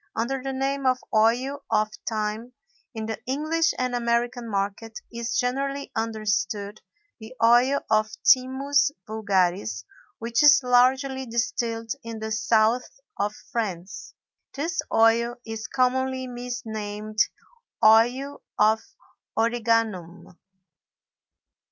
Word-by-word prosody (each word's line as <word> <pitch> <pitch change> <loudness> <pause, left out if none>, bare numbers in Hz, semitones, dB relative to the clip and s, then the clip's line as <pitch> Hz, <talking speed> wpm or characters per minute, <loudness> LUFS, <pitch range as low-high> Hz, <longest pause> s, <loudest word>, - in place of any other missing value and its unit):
Under 260 +4 -1
the 270 +1 -3
name 270 +1 -1
of 255 0 +3 0.2
Oil 245 +6 +2
of 215 0 +1 0.2
Thyme, 220 +2 -3 0.4
in 220 -1 -4
the 220 0 -5
English 315 +5 +1
and 255 -1 -1
American 240 0 -1
market, 205 +2 -3
is 235 0 -3
generally 275 +2 -1
understood 210 -2 -2 0.4
the 220 +3 -11
oil 245 +4 +5
of 215 0 +2 0.2
Thymus 265 +3 +4 0.2
vulgaris, 185 - 0 0.3
which 230 +1 0
is 290 -2 +7
largely 260 +2 +2
distilled 230 -1 -2
in 230 -1 -7
the 220 0 -5
South 220 +4 +1 0.2
of 205 +1 -1 0.2
France. 190 -5 -4 0.4
This 325 +4 -2
oil 230 +1 +3
is 225 -1 -5
commonly 260 0 0
misnamed 220 -4 -6 0.7
Oil 245 +6 +4 0.2
of 220 +1 +4 0.6
Origanum. 225 -7 0
230 Hz, 105 wpm, -25 LUFS, 215-255 Hz, 0.7 s, is